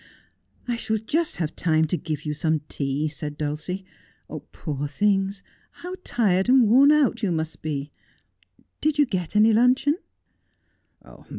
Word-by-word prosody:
' -, -, -47 dB, 0.2 s
I 240 Hz, -1 st, -1 dB
shall 220 Hz, -1 st, -1 dB
just 300 Hz, +10 st, -1 dB
have 160 Hz, -3 st, -3 dB
time 160 Hz, -2 st, +2 dB
to 160 Hz, -, -1 dB
give 155 Hz, -2 st, -5 dB
you 150 Hz, -, -1 dB
some 155 Hz, 0 st, 0 dB
tea,' 140 Hz, +2 st, -2 dB
said 150 Hz, -1 st, -6 dB
Dulcie. 155 Hz, +6 st, -4 dB, 0.3 s
' -, -, -11 dB
Poor 145 Hz, -2 st, -4 dB
things, 195 Hz, +4 st, 0 dB, 0.3 s
how 360 Hz, +1 st, -8 dB
tired 195 Hz, -4 st, +1 dB
and 255 Hz, -3 st, +6 dB
worn 270 Hz, +6 st, +6 dB
out 285 Hz, -5 st, +2 dB
you 205 Hz, -, 0 dB
must 160 Hz, -1 st, -3 dB
be! 145 Hz, -2 st, -4 dB, 0.9 s
Did 310 Hz, -1 st, +1 dB
you 295 Hz, -, +5 dB
get 185 Hz, -, -4 dB
any 215 Hz, +1 st, +5 dB
luncheon 255 Hz, +7 st, +3 dB
190 Hz, 155 wpm, -24 LUFS, 155-240 Hz, 0.9 s, and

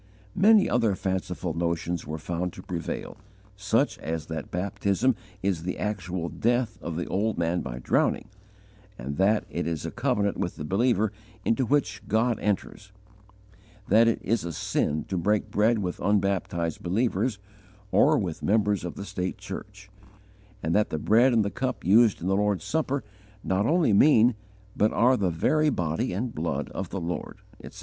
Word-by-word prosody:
Many 210 Hz, +1 st, +5 dB
other 115 Hz, -5 st, +2 dB
fanciful 90 Hz, -2 st, -3 dB
notions 85 Hz, 0 st, -2 dB
were 80 Hz, -, -4 dB
found 85 Hz, +2 st, -3 dB
to -, -, -10 dB
prevail, 85 Hz, -2 st, -5 dB, 0.4 s
such -, -, 0 dB
as 80 Hz, -2 st, -4 dB
that 80 Hz, -2 st, -6 dB
baptism 100 Hz, +6 st, 0 dB, 0.3 s
is 95 Hz, -4 st, 0 dB
the 90 Hz, +2 st, -4 dB
actual 95 Hz, -5 st, -3 dB
death 120 Hz, +5 st, 0 dB
of 85 Hz, -, -5 dB
the 85 Hz, -, -2 dB
old 105 Hz, +3 st, -1 dB
man 85 Hz, +1 st, 0 dB
by 60 Hz, -2 st, -6 dB
drowning, 65 Hz, -, +1 dB, 0.7 s
and 70 Hz, +3 st, -5 dB
that 105 Hz, +4 st, +3 dB
it -, -, -2 dB
is 80 Hz, -3 st, -3 dB
a -, -, -4 dB
covenant 100 Hz, 0 st, 0 dB
with 90 Hz, -, -2 dB
the 75 Hz, -, -6 dB
believer 110 Hz, +3 st, +2 dB, 0.3 s
into 120 Hz, +2 st, +1 dB
which 145 Hz, +2 st, 0 dB
God 110 Hz, +3 st, +1 dB
enters; 100 Hz, 0 st, -3 dB, 1.0 s
that 115 Hz, +3 st, +6 dB
it 115 Hz, -, +2 dB
is 115 Hz, -1 st, 0 dB
a 85 Hz, -, -4 dB
sin 75 Hz, -1 st, -1 dB
to 95 Hz, -, -3 dB
break 105 Hz, +4 st, 0 dB
bread 110 Hz, +3 st, +3 dB
with 90 Hz, -4 st, -3 dB
unbaptized 95 Hz, -5 st, 0 dB
believers 105 Hz, +3 st, 0 dB, 0.5 s
or -, -, +5 dB
with -, -, -3 dB
members 105 Hz, -1 st, +1 dB
of 90 Hz, -, -5 dB
the 100 Hz, -, -6 dB
state 90 Hz, -1 st, -3 dB
church; 100 Hz, -1 st, -9 dB, 0.7 s
and 80 Hz, +1 st, 0 dB
that 105 Hz, +2 st, +2 dB
the -, -, -2 dB
bread 115 Hz, -, +4 dB
and 115 Hz, -3 st, +3 dB
the 100 Hz, -, -2 dB
cup 130 Hz, -1 st, -3 dB
used 110 Hz, +2 st, +4 dB
in 90 Hz, -, -3 dB
the 95 Hz, -, +2 dB
Lord's 100 Hz, -3 st, +1 dB
Supper 140 Hz, -3 st, -1 dB, 0.4 s
not 95 Hz, +3 st, +1 dB
only 160 Hz, -, +3 dB
mean 120 Hz, +1 st, +6 dB, 0.4 s
but 105 Hz, -, +2 dB
are 125 Hz, +3 st, +4 dB
the 100 Hz, -6 st, +1 dB
very 155 Hz, -, +2 dB
body 80 Hz, -, -1 dB
and 115 Hz, +6 st, -3 dB
blood 75 Hz, -3 st, -2 dB
of 95 Hz, -3 st, -5 dB
the 95 Hz, -, -4 dB
Lord, 85 Hz, 0 st, -4 dB, 0.3 s
etc. -, -, -10 dB
100 Hz, 170 wpm, -26 LUFS, 85-110 Hz, 1.0 s, that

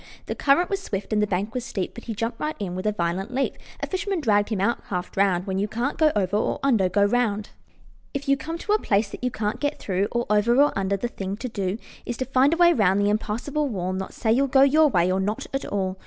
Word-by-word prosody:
The -, -, -3 dB
current 295 Hz, +6 st, +3 dB
was 395 Hz, 0 st, -1 dB
swift 200 Hz, -, -4 dB
and 210 Hz, -, +2 dB
the 210 Hz, -, +2 dB
bank 200 Hz, +3 st, -2 dB
was 250 Hz, -, -3 dB
steep, 200 Hz, -7 st, -4 dB
But 235 Hz, -, -11 dB
he 225 Hz, -, -4 dB
jumped 230 Hz, +2 st, -3 dB
right 305 Hz, +1 st, -2 dB
in 190 Hz, -4 st, -4 dB
with 185 Hz, +3 st, -3 dB
a -, -, +3 dB
violent 190 Hz, +4 st, -2 dB
leap. 270 Hz, -, 0 dB, 0.3 s
A -, -, 0 dB
fisherman 385 Hz, 0 st, -2 dB
dragged 205 Hz, -7 st, +2 dB
him 215 Hz, -4 st, -1 dB
out 230 Hz, +5 st, +1 dB
half 180 Hz, -2 st, -4 dB
drowned: 195 Hz, -2 st, +1 dB
"When 190 Hz, -1 st, -2 dB
you 205 Hz, -, 0 dB
can't 240 Hz, +9 st, -2 dB
go 310 Hz, -1 st, +5 dB
over 200 Hz, -1 st, 0 dB
or 210 Hz, -, 0 dB
under, 225 Hz, -9 st, +3 dB
go 200 Hz, +2 st, +3 dB
round." 210 Hz, -2 st, 0 dB, 0.6 s
If 280 Hz, -1 st, -5 dB
you 275 Hz, -, +4 dB
come 325 Hz, +5 st, -5 dB
to 415 Hz, -, -4 dB
a 430 Hz, -, +3 dB
place 205 Hz, -, +1 dB
that -, -, -9 dB
you 250 Hz, -, +2 dB
can't 210 Hz, -3 st, -3 dB
get 290 Hz, 0 st, -1 dB
through, 195 Hz, +1 st, -1 dB
Or 240 Hz, 0 st, 0 dB
over 210 Hz, +3 st, +3 dB
or 290 Hz, +2 st, +4 dB
under, 195 Hz, 0 st, 0 dB
the 240 Hz, -, -2 dB
thing 195 Hz, -4 st, -5 dB
to 255 Hz, -, -4 dB
do 200 Hz, -3 st, -2 dB, 0.3 s
Is 240 Hz, -, -4 dB
to 260 Hz, -, -2 dB
find 265 Hz, +3 st, +3 dB
a 335 Hz, -, +1 dB
way 345 Hz, 0 st, +6 dB
round 200 Hz, -, +3 dB
the 205 Hz, 0 st, +2 dB
impassable 240 Hz, +8 st, -1 dB
wall, 185 Hz, -4 st, -2 dB
Not 190 Hz, 0 st, -5 dB
say 220 Hz, -, 0 dB
you'll 270 Hz, +4 st, +3 dB
go 270 Hz, 0 st, +5 dB
YOUR 305 Hz, +3 st, +5 dB
way 180 Hz, -8 st, +2 dB
or 190 Hz, -, +1 dB
not 205 Hz, +3 st, -2 dB
at 270 Hz, -, -2 dB
all. 190 Hz, -2 st, -2 dB
215 Hz, 270 wpm, -24 LUFS, 195-270 Hz, 0.6 s, way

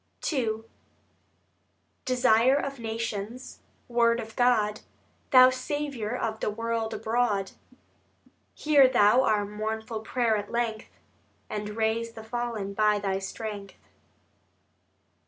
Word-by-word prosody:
II 225 Hz, -5 st, -1 dB, 1.4 s
Desire 250 Hz, 0 st, +4 dB
of 275 Hz, -2 st, -3 dB
Nations, 225 Hz, +1 st, -5 dB, 0.3 s
Word 235 Hz, -1 st, +2 dB
of 225 Hz, -1 st, -8 dB
God, 215 Hz, -4 st, +2 dB, 0.5 s
Thou 255 Hz, -1 st, +8 dB
Saviour 255 Hz, -3 st, -3 dB
of 220 Hz, -2 st, -3 dB
the -, -, -1 dB
World 230 Hz, +1 st, -2 dB
abroad, 220 Hz, -4 st, 0 dB, 1.0 s
Hear 290 Hz, -3 st, +5 dB
Thou 220 Hz, 0 st, +4 dB
our 210 Hz, -5 st, +1 dB
mournful 220 Hz, +2 st, -4 dB
prayer 225 Hz, 0 st, 0 dB
at 205 Hz, 0 st, -5 dB
length, 235 Hz, -2 st, -2 dB, 0.6 s
And 210 Hz, 0 st, -5 dB
raise 225 Hz, +1 st, 0 dB
the 220 Hz, -, -10 dB
fallen 225 Hz, -3 st, -4 dB
by 210 Hz, 0 st, +3 dB
Thy 195 Hz, -1 st, -1 dB
strength. 200 Hz, 0 st, -6 dB
225 Hz, 105 wpm, -27 LUFS, 210-245 Hz, 1.4 s, Thou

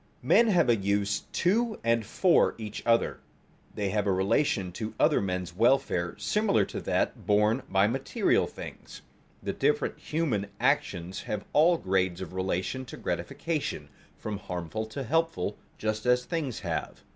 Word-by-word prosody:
Men 235 Hz, -, +5 dB
have 175 Hz, -, +4 dB
a 120 Hz, -, +5 dB
use 100 Hz, 0 st, 0 dB
to 220 Hz, +5 st, +1 dB
and 115 Hz, -1 st, +2 dB
for 175 Hz, -, +3 dB
each 105 Hz, -2 st, -6 dB
other; 115 Hz, 0 st, +2 dB, 0.6 s
they 100 Hz, -1 st, -1 dB
have 105 Hz, 0 st, 0 dB
a -, -, +3 dB
relation 95 Hz, +1 st, +1 dB
to 110 Hz, +4 st, -5 dB
other -, -, +4 dB
men's 90 Hz, -2 st, -3 dB
welfare 105 Hz, -6 st, +2 dB
similar 210 Hz, -1 st, +2 dB
to -, -, -6 dB
that -, -, -1 dB
borne 105 Hz, +4 st, +3 dB
by 95 Hz, +1 st, +4 dB
material 135 Hz, -, +1 dB
things. -, -, -10 dB, 0.4 s
The -, -, -2 dB
different 445 Hz, 0 st, 0 dB
human 140 Hz, -11 st, -1 dB
actions 85 Hz, +2 st, 0 dB
have 105 Hz, -, -3 dB
all 165 Hz, +4 st, +5 dB
grades 95 Hz, -, 0 dB
of 95 Hz, -2 st, -7 dB
relation 95 Hz, +7 st, -2 dB
to -, -, -9 dB
gratification, 150 Hz, -, -3 dB, 0.3 s
from 105 Hz, -2 st, -5 dB
harmful 90 Hz, +4 st, -4 dB
to 135 Hz, +5 st, -5 dB
helpful, 165 Hz, -5 st, 0 dB, 0.2 s
just 110 Hz, +1 st, -2 dB
as 125 Hz, 0 st, +3 dB
things 150 Hz, -, -3 dB
have. 85 Hz, -5 st, -4 dB
110 Hz, 150 wpm, -28 LUFS, 95-145 Hz, 0.6 s, Men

